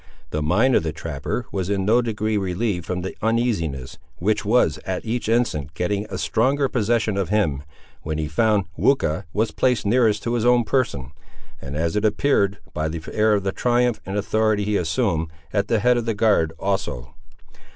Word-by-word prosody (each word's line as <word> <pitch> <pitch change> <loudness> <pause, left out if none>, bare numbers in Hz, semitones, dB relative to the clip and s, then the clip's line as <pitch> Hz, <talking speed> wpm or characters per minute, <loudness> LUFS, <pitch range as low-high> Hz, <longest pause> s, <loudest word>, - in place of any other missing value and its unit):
The 75 - -1
mind 105 - +3
of - - +4
the 80 -1 -2
trapper 80 - -4
was 95 -1 -2
in 100 -2 0
no 115 +4 +4
degree 110 -2 -1
relieved 95 -2 -1
from 90 0 -2
the 95 - -5
uneasiness 105 - -1 0.2
which 105 +4 0
was, 115 +4 +2
at 95 +2 -4
each 115 0 -2
instant, 80 - 0
getting 100 +5 -1
a 95 - -4
stronger 135 +8 +1
possession 110 -4 0
of 95 -3 -1
him, 85 -10 +1 0.4
when 80 0 -3
he 80 -1 -2
found 105 +5 +2
Weucha 100 - +1
was 110 +4 0
placed 125 -4 +1
nearest 110 -1 +2
to 120 - -1
his 120 -2 0
own 120 0 +4
person, 70 - -1 0.5
and, 70 +1 -6
as 80 +3 -1
it 105 - 0
appeared 105 -2 +2 0.2
by 80 -1 -1
the 80 0 -5
air 110 0 +3
of 100 -1 -1
triumph 120 -1 +1
and 95 +2 -4
authority 110 0 +1
he 105 0 0
assumed, 85 -2 0 0.3
at 100 -1 +1
the 115 - +2
head 125 +3 +3
of 120 -1 -2
the 115 - 0
guard 100 -7 +3
also. 95 - -3
105 Hz, 185 wpm, -22 LUFS, 85-115 Hz, 0.5 s, of